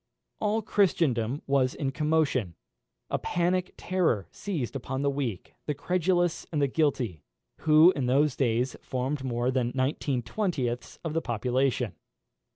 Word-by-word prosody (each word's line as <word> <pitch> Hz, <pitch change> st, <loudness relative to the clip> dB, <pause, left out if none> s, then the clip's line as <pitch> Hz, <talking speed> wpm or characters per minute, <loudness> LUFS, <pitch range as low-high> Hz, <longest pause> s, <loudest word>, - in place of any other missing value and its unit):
All 215 Hz, +1 st, 0 dB
Christendom 145 Hz, -, +1 dB
was 135 Hz, -2 st, +2 dB
in 135 Hz, -3 st, -2 dB
commotion. 145 Hz, -, +1 dB, 0.6 s
A -, -, +1 dB
panic 180 Hz, +1 st, 0 dB
terror 165 Hz, -, 0 dB
seized 155 Hz, -, -4 dB
upon 130 Hz, +1 st, -3 dB
the 140 Hz, -, +2 dB
weak, 130 Hz, -9 st, -4 dB
the 150 Hz, -, 0 dB
credulous, 175 Hz, +2 st, 0 dB
and 155 Hz, -, 0 dB
the 140 Hz, -, +4 dB
guilty, 130 Hz, -, 0 dB, 0.4 s
who 155 Hz, +3 st, +7 dB
in 135 Hz, -8 st, -2 dB
those 140 Hz, +2 st, +3 dB
days 125 Hz, 0 st, +1 dB
formed 130 Hz, +2 st, -2 dB
more 120 Hz, 0 st, 0 dB
than 125 Hz, -2 st, 0 dB
nineteen 130 Hz, -1 st, 0 dB
twentieths 130 Hz, -, -2 dB
of 160 Hz, -2 st, -3 dB
the 165 Hz, -, +1 dB
population. 125 Hz, -, 0 dB
140 Hz, 140 wpm, -28 LUFS, 125-160 Hz, 0.6 s, who